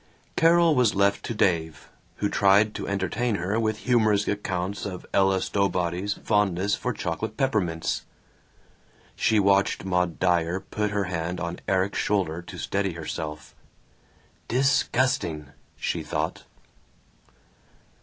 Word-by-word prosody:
Carol 165 0 +5
was 125 -6 +3
left 100 +1 +2
to 115 - -4
Dave, 80 -7 0 0.3
who 105 - -1
tried 100 +2 +4
to - - -5
entertain 100 +4 -1
her 100 +5 -1
with 110 -1 0
humorous 110 -4 +2
accounts 95 -1 -2
of 95 -3 -6
Ella 95 -1 +3
Stowbody's 95 0 0
fondness 100 -1 +1
for 125 - -1
chocolate 105 +1 -4
peppermints. 100 - -1 1.1
She 110 -1 +2
watched 100 -1 +2
Maud 90 -2 0
Dyer 90 0 +1
put 105 +2 -3
her 105 -1 0
hand 90 -1 -3
on 85 0 -4
Erik's 95 +1 +1
shoulder 90 -5 0
to 85 - -10
steady 100 -2 -1
herself. 75 -1 -6 0.9
"Disgusting!" 120 - +1 0.3
she - - -2
thought. - - -3
100 Hz, 120 wpm, -25 LUFS, 90-105 Hz, 1.1 s, Carol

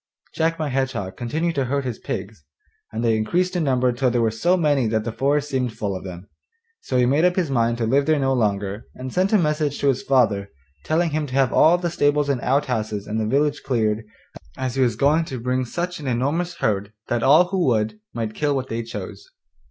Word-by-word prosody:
Jack 165 +1 0
my 155 -2 -2
Hedgehog 130 -8 -2
continued 160 +8 -2
to 135 -3 0
herd 140 +2 -1
his 120 -4 -4
pigs, 95 -3 -6 0.5
and 110 +2 -3
they 115 -1 +3
increased 180 +12 0
in 175 - +1
number 130 -3 +2
till 125 +1 +1
there 120 -1 +1
were 110 - +2
so 175 +12 +2
many 145 -7 +2
that 110 0 0
the 115 - -3
forest 145 +4 0
seemed 125 -4 -2
full 100 -2 -2
of 95 - -6
them. 90 0 -9 0.5
So 130 - -2
he 125 - +4
made 140 +6 +2
up 180 0 +3
his 175 -7 0
mind 115 -2 +1
to 115 - -1
live 140 +5 +2
there 155 -1 +3
no 135 -1 +1
longer, 105 -3 -1
and 130 0 -7
sent 185 +2 +1
a 215 - +5
message 150 -4 0
to 140 - +3
his 130 -1 0
father 105 -7 +2 0.4
telling 165 +1 +1
him 150 0 -1
to 130 - -6
have 135 -2 +2
all 170 +3 +5
the 175 -1 -2
stables 145 -3 +1
and 130 -3 0
outhouses 115 -7 -1
in 110 +1 -3
the 110 - -1
village 145 +4 +1
cleared, 110 -4 0 0.5
as 130 -2 -2
he 135 - 0
was 120 -4 +2
going 145 +7 +3
to 130 -5 -6
bring 125 +2 -1
such 175 +7 -4
an 145 - -6
enormous 145 +8 -1
herd 105 -7 -1
that 120 -1 0
all 160 +8 +5
who 185 -4 0
would 110 -3 0
might 115 -2 -4
kill 145 +2 0
what 130 -1 -3
they 115 +1 -2
chose. 115 - -8
130 Hz, 230 wpm, -22 LUFS, 115-150 Hz, 0.5 s, a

